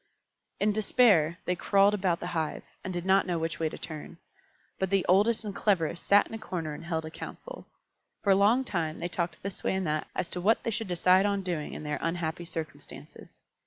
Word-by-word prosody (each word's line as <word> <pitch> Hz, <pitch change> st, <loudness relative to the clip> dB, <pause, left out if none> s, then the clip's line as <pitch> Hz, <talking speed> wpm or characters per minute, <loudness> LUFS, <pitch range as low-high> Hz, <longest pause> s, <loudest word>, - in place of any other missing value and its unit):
In 210 Hz, +1 st, +3 dB
despair 200 Hz, -6 st, +3 dB
they 180 Hz, -, 0 dB
crawled 200 Hz, +3 st, +4 dB
about 185 Hz, -4 st, +1 dB
the -, -, -4 dB
hive, 160 Hz, -2 st, -2 dB, 0.2 s
and 185 Hz, -, -4 dB
did 175 Hz, -1 st, -4 dB
not 190 Hz, +1 st, +4 dB
know 175 Hz, -2 st, 0 dB
which 165 Hz, 0 st, -3 dB
way 160 Hz, -1 st, +1 dB
to -, -, -8 dB
turn. 160 Hz, +1 st, -8 dB, 0.6 s
But 190 Hz, -, 0 dB
the 195 Hz, -1 st, +2 dB
oldest 210 Hz, +5 st, +3 dB
and 205 Hz, -, -4 dB
cleverest 175 Hz, -5 st, +1 dB
sat 200 Hz, 0 st, +5 dB
in -, -, -12 dB
a 225 Hz, -, -4 dB
corner 170 Hz, -7 st, -4 dB
and 150 Hz, -, -8 dB
held 160 Hz, -2 st, -2 dB
a 160 Hz, -, -7 dB
council. -, -, -9 dB, 0.6 s
For 200 Hz, -, +3 dB
a -, -, +7 dB
long 215 Hz, +7 st, +4 dB
time 170 Hz, -9 st, -2 dB
they 175 Hz, -, -3 dB
talked 170 Hz, -2 st, -3 dB
this 195 Hz, -1 st, -5 dB
way -, -, +1 dB
and 190 Hz, -1 st, -1 dB
that 155 Hz, -1 st, -1 dB
as -, -, -1 dB
to 180 Hz, -, -3 dB
what 215 Hz, +5 st, +3 dB
they 230 Hz, -, -1 dB
should 225 Hz, 0 st, -3 dB
decide 185 Hz, +2 st, +4 dB
on 200 Hz, -1 st, -1 dB
doing 170 Hz, -5 st, -3 dB
in -, -, -7 dB
their 150 Hz, 0 st, -3 dB
unhappy 165 Hz, 0 st, -2 dB
circumstances. 165 Hz, -2 st, -8 dB
180 Hz, 220 wpm, -29 LUFS, 165-200 Hz, 0.6 s, a